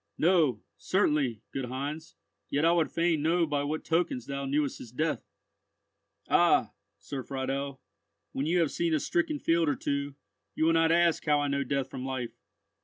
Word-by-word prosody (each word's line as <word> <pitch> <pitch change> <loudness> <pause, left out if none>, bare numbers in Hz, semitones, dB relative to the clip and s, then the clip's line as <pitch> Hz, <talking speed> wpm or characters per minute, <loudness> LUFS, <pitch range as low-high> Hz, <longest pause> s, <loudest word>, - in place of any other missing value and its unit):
"No, 160 - +3
certainly, 150 - +1
good 135 -2 -2
Heinz; 140 - -5 0.3
yet 145 +3 +1
I 165 - +5
would 165 -4 +2
fain 165 -2 +1
know 165 +2 +2
by 145 -2 -1
what 155 +2 -3
tokens 165 -7 0
thou 140 0 -4
knewest 140 0 0
his 115 - -10
death." 155 +5 -1 1.1
"Ah! - - +4 0.3
Sir 135 -2 -6
Friedel; 135 +1 -3 0.5
when 140 +3 -2
you 175 +2 +3
have 160 - +1
seen 170 -2 0
a - - +1
stricken 320 - 0
field 165 - +2
or - - +1
two, 140 0 -2 0.4
you 155 - +1
will 165 - +4
not 165 0 +4
ask 170 -1 +3
how 150 -2 +3
I 145 0 0
know 140 0 0
death 135 -1 -2
from 130 - -6
life." 130 -3 -4
145 Hz, 180 wpm, -29 LUFS, 135-165 Hz, 1.1 s, I